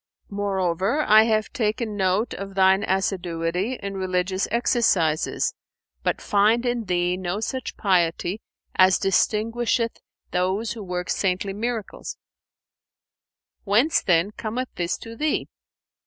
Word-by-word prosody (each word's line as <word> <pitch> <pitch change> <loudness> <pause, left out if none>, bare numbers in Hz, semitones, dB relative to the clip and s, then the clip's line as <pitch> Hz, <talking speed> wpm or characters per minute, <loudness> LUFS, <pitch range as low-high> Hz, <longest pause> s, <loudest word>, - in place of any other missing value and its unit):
Moreover, 195 - 0
I 215 +1 +7
have 215 -1 0
taken 220 -3 -1
note 195 +3 +1
of 195 0 -7
thine 190 +1 +4
assiduity 180 +1 -1
in 200 -1 -4
religious 185 0 -1
exercises, 205 -9 +1 0.5
but - - 0
find 215 +4 +2
in 240 -2 -1
thee 180 -1 +1
no 185 +2 -3
such 255 +3 -4
piety 180 0 +1 0.3
as 185 -1 +5
distinguisheth 230 +4 +1 0.3
those 190 +5 0
who 230 - -6
work 180 -2 -3
saintly 195 +1 0
miracles: 225 0 -4 1.5
whence, 230 +10 +3
then, 175 +2 +2
cometh 235 +4 -4
this 175 0 -2
to 230 0 -10
thee?" 305 +4 -1
200 Hz, 115 wpm, -24 LUFS, 185-225 Hz, 1.5 s, I